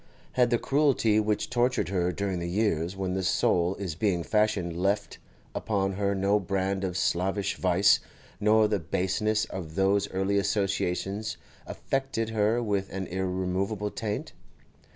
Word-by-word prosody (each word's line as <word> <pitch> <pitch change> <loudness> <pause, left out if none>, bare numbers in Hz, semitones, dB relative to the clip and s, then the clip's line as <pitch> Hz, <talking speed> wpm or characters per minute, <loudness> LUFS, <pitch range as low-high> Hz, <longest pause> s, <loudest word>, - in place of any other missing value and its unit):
Had 125 -1 +3
the 120 - +3
cruelty 135 -6 +2
which 105 +2 -1
tortured 120 -7 +1
her 90 -2 +1
during 95 -1 -2
the 85 0 -3
years 90 -3 0
when 95 -1 -2
the 95 - -1
soul 90 0 +2
is 95 -5 -4
being 90 0 0
fashioned 105 -4 +1
left 100 +4 -1 0.3
upon 100 -3 -1
her 100 +1 0
no 100 +2 +2
brand 95 0 -1
of 90 -1 -2
slavish 95 +3 0
vice, 95 +1 +4 0.4
nor 110 +1 +4
the 105 -1 0
baseness 95 +6 0
of 80 -4 -7
those 100 +1 +2
early 95 +2 +1
associations 100 +1 -1 0.3
affected 135 -5 -2
her 110 +2 +1
with 100 -3 -1
any 95 -2 -5
irremovable 95 +2 -1
taint? 105 -2 -4
100 Hz, 145 wpm, -28 LUFS, 95-105 Hz, 0.4 s, vice